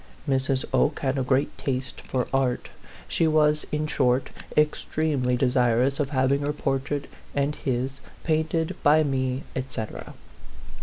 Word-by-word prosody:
Mrs. 135 -1 +1
Oke 145 0 +2
had 135 0 0
a - - +1
great 130 +2 +1
taste 130 -1 -3
for 125 -1 -2
art; 130 -2 +1 0.4
she 165 - +2
was, 150 -1 +3
in 150 0 0
short, 130 -3 +1 0.3
extremely 150 -4 +1
de 130 - +2
sirous 125 +1 +2
of 140 -2 0
having 135 0 +2
her 145 +1 -1
portrait 140 0 -1 0.3
and 140 +1 +1
his 130 -2 -2 0.2
painted 160 0 0
by 155 +2 +5
me, 130 -2 -1
et 130 - -1
cetera. 110 -3 -6
135 Hz, 145 wpm, -26 LUFS, 130-150 Hz, 0.4 s, by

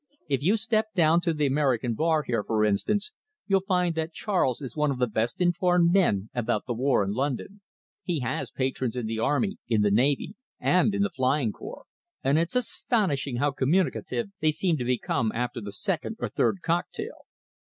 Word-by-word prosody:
If 140 -3 0
you 195 +9 +3
step 220 0 +1
down 165 -1 +4
to 175 - 0
the 150 -2 0
American 130 -4 +1
bar 160 +4 +1
here, 115 -5 -1
for 110 -1 +1
instance, 200 - 0 0.3
you'll 195 -2 +2
find 180 -2 +1
that 160 0 -3
Charles 180 - 0
is 130 -5 -7
one 150 -1 +1
of 135 - -1
the 125 - +2
best 115 +1 -2
informed 175 -1 +3
men 110 - +2
about 115 -4 -1
the 125 - -2
war 125 -2 +2
in 100 - -2
London. 140 - -3 0.4
He 170 -6 -2
has 125 +1 -2
patrons 130 -2 -2
in 125 -2 -2
the 110 0 -3
Army, 145 - 0
in 110 -3 +2
the 105 - +3
Navy, 135 - +2 0.3
and 185 +3 +3
in 200 - +2
the 205 - -1
Flying 130 -5 +1
Corps, 475 - -10 0.4
and 140 +4 +3
it's 170 +8 -1
astonishing 200 - 0
how 145 +4 +1
communicative 185 - 0
they 155 - +2
seem 170 +2 +1
to 125 - -3
become 120 -2 0
after 120 0 -2
the 100 -1 -6
second 170 - -1
or - - -2
third 190 - 0
cocktail." 175 - -3
145 Hz, 190 wpm, -26 LUFS, 125-180 Hz, 0.4 s, down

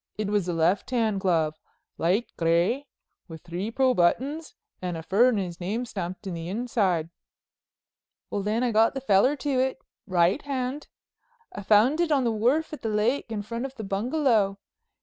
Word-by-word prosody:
It 210 -1 -2
was 205 -4 +1
a 175 - -1
left 170 +4 +1
hand 225 -5 +1
glove, 160 -4 +1 0.4
light 190 +8 +1
gray 175 +12 +1 0.4
with 160 -3 -10
three 175 +5 -4
pearl 260 +2 +2
buttons 275 - 0 0.3
and 180 -2 -3
a 160 - -7
furrener's 195 -2 +2
name 210 +7 -2
stamped 185 -3 -6
in 190 - -4
the 165 0 -5
inside." 195 -7 0 1.2
"Well, 200 - -1
then, 215 +4 0
I 245 - +1
got 225 +3 +3
the - - -1
feller 255 +4 +3
to 280 -2 -1
it—right 195 -5 0
hand. 275 0 -3 0.7
I 205 - -6
found 220 - +4
it 340 -2 0
on 275 -3 +3
the 235 - +1
wharf 250 +10 +1
at 305 - -7
the 225 - -2
lake, 225 +4 0
in 210 -2 -3
front 230 +3 -5
of 270 - -16
the 220 - -6
bungalow. 215 -1 +1
215 Hz, 170 wpm, -26 LUFS, 185-255 Hz, 1.2 s, found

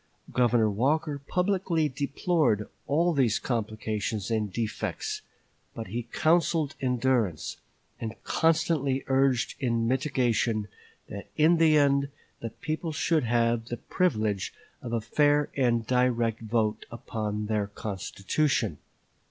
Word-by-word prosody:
Governor 120 -3 +3
Walker 145 +6 0
publicly 180 -4 +1
deplored 140 - 0 0.2
all 165 +5 +2
these 125 -7 +2
complications 110 -2 -2
and 105 -3 0
defects; 425 - -3 0.5
but 115 -5 -6
he 120 +3 -4
counseled 160 -2 +2
endurance, 120 - 0 0.4
and 115 -1 -4
constantly 155 -4 +1
urged 135 -2 +2
in 115 -3 +1
mitigation 120 -5 +1 0.4
that 100 0 -8
in 160 +3 +5
the 160 -2 +5
end 140 -1 +3 0.3
the 115 - -4
people 155 +7 -4
should 155 -1 +1
have 115 -1 +1
the 120 +1 -5
privilege 110 - -1 0.3
of 120 - -6
a 115 -1 0
fair 145 +5 +2
and 120 -4 +2
direct 120 -2 +1
vote 110 -1 -1
upon 105 -2 -4
their 105 -1 0
constitution. 100 - -1
125 Hz, 115 wpm, -28 LUFS, 110-150 Hz, 0.5 s, in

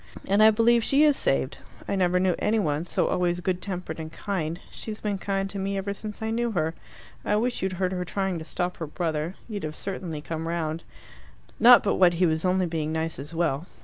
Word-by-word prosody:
"And 200 +2 +3
I 215 - +9
believe 230 +2 +4
she 275 +5 +4
is 295 -2 +5
saved. 135 - 0 0.3
I - - 0
never 180 -1 +2
knew 185 -1 +2
any 220 +2 +1
one 155 -5 0
so - - 0
always 175 -1 0
good 180 0 -1
tempered 180 -5 -5
and 160 0 -6
kind. 170 -4 -3
She's 215 -1 -6
been 205 -2 -2
kind 195 -1 -1
to 200 - -5
me 195 +1 -2
ever 200 +1 -2
since 210 +1 -7
I 220 - -1
knew 235 +1 0
her. 160 -3 0 0.5
I 210 - +1
wish 240 +3 0
you'd 190 0 -1
heard 185 0 -1
her 180 -1 -2
trying 190 -1 -2
to - - -6
stop 180 +2 -3
her 165 - -4
brother: 160 +2 -2
you'd 210 -3 -5
have 155 0 -4
certainly 180 -5 -5
come 160 +2 -5
round. 165 -1 -2 0.8
Not 245 +1 +8
but 200 - +1
what 180 -2 +5
he 180 +2 +3
was 160 -1 +1
only 185 0 +2
being 160 -2 -2
nice 160 -1 -2
as 150 +4 -7
well. 165 -1 0
180 Hz, 225 wpm, -26 LUFS, 160-200 Hz, 0.8 s, I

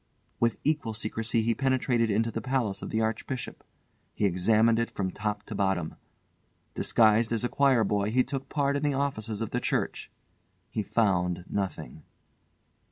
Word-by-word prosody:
With 115 -1 +2
equal 145 -7 0
secrecy 115 +1 -1
he 115 +1 +2
penetrated 130 -3 +1
into 110 +3 +1
the 115 - -4
palace 120 -5 -1
of - - -5
the 110 - 0
Archbishop. 115 +3 -3 0.5
He 105 - +1
examined 110 +5 +3
it 115 - 0
from 95 -2 -3
top 105 0 -3
to 110 - -8
bottom. 95 -5 0 0.8
Disguised 110 0 +3
as 115 -1 0
a 120 - 0
choir 135 -5 +3
boy 100 0 0
he 125 +3 +3
took 135 0 -5
part 140 -1 +1
in 140 - -1
the 145 -2 +1
offices 115 -6 -2
of 110 - -3
the 125 - 0
church. - - -2 0.6
He 110 - -1
found 90 -5 0
nothing. 95 -6 -4
115 Hz, 165 wpm, -28 LUFS, 105-125 Hz, 0.8 s, examined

